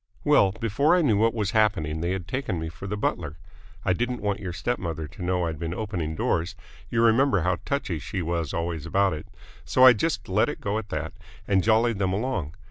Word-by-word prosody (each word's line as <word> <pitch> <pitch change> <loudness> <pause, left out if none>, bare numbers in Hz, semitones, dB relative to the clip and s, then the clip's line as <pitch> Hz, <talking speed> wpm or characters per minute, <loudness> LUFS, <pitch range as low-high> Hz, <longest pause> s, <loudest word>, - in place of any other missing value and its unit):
"Well, 95 - +5
before 120 - +2
I 180 - +3
knew 115 -8 +3
what 115 +2 +2
was 105 -2 -1
happening 95 -9 +1
they 85 - -1
had 90 -2 -3
taken 125 - -2
me 80 0 -4
for 85 +4 -9
the 105 +2 -3
butler. 80 -6 -2 0.5
I - - +3
didn't 125 +5 -2
want 100 0 0
your 95 -3 -5
step 120 +8 -2
mother 80 -3 -4
to - - -13
know 90 0 0
I'd 80 -3 -4
been 85 +1 -3
opening 90 -7 -3
doors 85 +5 -1 0.3
you 115 -1 +1
remember 115 -2 +4
how 90 +1 +1
touchy 100 - -2
she 95 +4 -4
was 85 -3 -2
always 85 -2 -3
about 95 +2 +2
it 75 - -7 0.4
so 130 - +4
I 130 - +10
just 105 - -2
let - - +2
it - - -5
go 100 +2 -1
at 105 -2 -9
that 80 +3 -4 0.3
and 95 -2 +3
jollied 110 -1 +3
them 95 -2 +1
along. 95 - -2
95 Hz, 220 wpm, -26 LUFS, 85-110 Hz, 0.5 s, I